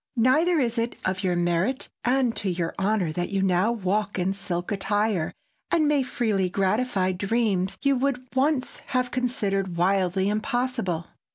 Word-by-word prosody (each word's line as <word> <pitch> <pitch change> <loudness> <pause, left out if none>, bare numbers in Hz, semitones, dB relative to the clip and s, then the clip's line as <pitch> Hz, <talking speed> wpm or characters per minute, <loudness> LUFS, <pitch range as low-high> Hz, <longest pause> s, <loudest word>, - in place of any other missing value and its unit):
Neither 305 +9 +4
is 235 -3 0
it 230 +1 -1
of 190 0 -1
your 180 -2 +1
merit 175 +8 0 0.2
and 250 -1 +2
to 200 - -1
your 170 -2 -2
honor 190 -4 +1
that 175 +2 -2
you 195 -1 0
now 190 +4 +3
walk 205 -1 -1
in 185 +1 0
silk 180 -1 -4
attire, 205 -3 0 0.4
and 315 -3 +3
may 290 -2 +3
freely 215 -7 0
gratify 195 0 +1
dreams 195 -1 0
you 275 -1 +3
would 255 -1 -1
once 265 0 0
have 250 -1 0
considered 195 -8 -1
wildly 190 +1 +2
impossible. 215 - -1
205 Hz, 155 wpm, -25 LUFS, 185-250 Hz, 0.4 s, Neither